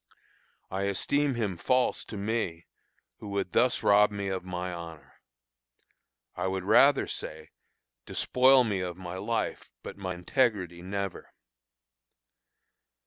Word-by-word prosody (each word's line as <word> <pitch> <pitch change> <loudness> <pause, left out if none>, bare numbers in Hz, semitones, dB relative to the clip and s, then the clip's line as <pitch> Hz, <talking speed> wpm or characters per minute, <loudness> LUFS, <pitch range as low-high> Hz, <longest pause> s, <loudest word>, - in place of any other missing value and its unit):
I 95 +1 -1
esteem 140 +8 0
him 105 -6 -2
false 125 +7 +1
to 110 - -7
me 100 -5 -2 0.5
who 105 - -9
would 100 -2 -2
thus 125 0 +2
rob 105 +1 +6
me 100 -1 -4
of 95 -1 -3
my 90 0 -4
honor. 85 -2 -10 1.1
I - - -2
would 95 -1 -2
rather 135 +8 +5
say, 80 0 -6 0.6
"despoil 130 +1 +4
me 105 -5 -1
of 90 -1 -4
my 90 0 -6
life, 110 +4 -2
but - - -8
my 95 -2 -4
integrity 90 -3 0
never." 100 +1 -5
100 Hz, 125 wpm, -28 LUFS, 90-115 Hz, 1.1 s, rob